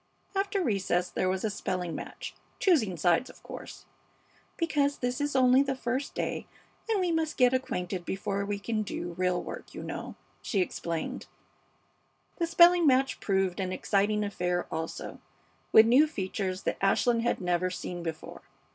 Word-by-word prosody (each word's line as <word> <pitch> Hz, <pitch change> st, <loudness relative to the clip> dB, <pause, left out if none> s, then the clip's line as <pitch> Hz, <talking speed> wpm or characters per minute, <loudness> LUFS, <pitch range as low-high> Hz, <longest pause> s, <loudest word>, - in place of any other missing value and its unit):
After 395 Hz, 0 st, 0 dB
recess 190 Hz, -, 0 dB
there 185 Hz, -, 0 dB
was 185 Hz, 0 st, -1 dB
a 215 Hz, -, 0 dB
spelling 180 Hz, -4 st, -3 dB
match, -, -, -7 dB, 0.2 s
choosing 235 Hz, -, +2 dB
sides, 175 Hz, -, +2 dB
of -, -, -16 dB
course, -, -, -9 dB, 0.7 s
"Because 290 Hz, -4 st, +1 dB
this 250 Hz, +3 st, -2 dB
is 290 Hz, -1 st, -1 dB
only 255 Hz, 0 st, +6 dB
the 275 Hz, -1 st, 0 dB
first 255 Hz, +2 st, -3 dB
day, -, -, -3 dB, 0.4 s
and 435 Hz, -3 st, +2 dB
we 360 Hz, -2 st, +1 dB
must 320 Hz, -1 st, -1 dB
get 250 Hz, -1 st, +5 dB
acquainted 185 Hz, -8 st, -2 dB
before 195 Hz, +2 st, -2 dB
we 205 Hz, 0 st, -2 dB
can 215 Hz, +2 st, -2 dB
do 175 Hz, -4 st, -4 dB
real 180 Hz, 0 st, +1 dB
work, -, -, -8 dB
you -, -, -6 dB
know," -, -, -6 dB, 0.3 s
she 205 Hz, -, -1 dB
explained. 170 Hz, -2 st, -3 dB, 1.1 s
The 335 Hz, -, 0 dB
spelling 345 Hz, 0 st, +6 dB
match 265 Hz, 0 st, +3 dB
proved 190 Hz, -2 st, 0 dB
an 185 Hz, -1 st, -1 dB
exciting 205 Hz, +2 st, +1 dB
affair 180 Hz, -3 st, -1 dB
also, 160 Hz, 0 st, -5 dB, 0.5 s
with 220 Hz, -, +9 dB
new 260 Hz, +7 st, +6 dB
features 190 Hz, -7 st, -3 dB
that -, -, -2 dB
Ashland 230 Hz, +4 st, +3 dB
had 235 Hz, -, 0 dB
never 180 Hz, 0 st, 0 dB
seen 180 Hz, -1 st, -5 dB
before. 165 Hz, -2 st, -6 dB
210 Hz, 160 wpm, -29 LUFS, 185-270 Hz, 1.1 s, with